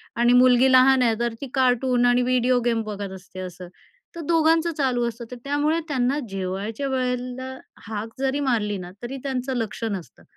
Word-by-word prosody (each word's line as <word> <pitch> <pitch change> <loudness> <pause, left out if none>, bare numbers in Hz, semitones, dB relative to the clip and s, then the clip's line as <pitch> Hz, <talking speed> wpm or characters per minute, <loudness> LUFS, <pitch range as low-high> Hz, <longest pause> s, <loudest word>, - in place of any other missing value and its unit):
आणि 240 +1 +4
मुलगी 255 +1 +6
लहान 260 0 +6
आहे 225 -2 +3
तर 235 -1 -1
ती 280 - -4
कार्टून 250 -1 +2
आणि 245 0 +4
व्हिडिओ 250 0 +2
गेम 230 -1 +1
बघत 205 -2 -5
असते 185 0 -12
असं, 180 -1 -7 0.5
तर 335 - -5
दोघांचं 330 0 +3
चालू 250 -4 +1
असतं. 235 +1 -9
तर - - -5
त्यामुळे 290 +3 +1
त्यांना 265 +1 +1
जेवायच्या 195 +7 -3
वेळेला 255 0 -3 0.3
हाक 220 0 -4
जरी 270 +1 0
मारली 220 -7 0
ना 180 -1 -8
तरी 265 +3 -5
त्यांचं 265 -1 -2
लक्ष 230 0 -4
नसतं. 190 -5 -7
250 Hz, 175 wpm, -24 LUFS, 225-265 Hz, 0.5 s, मुलगी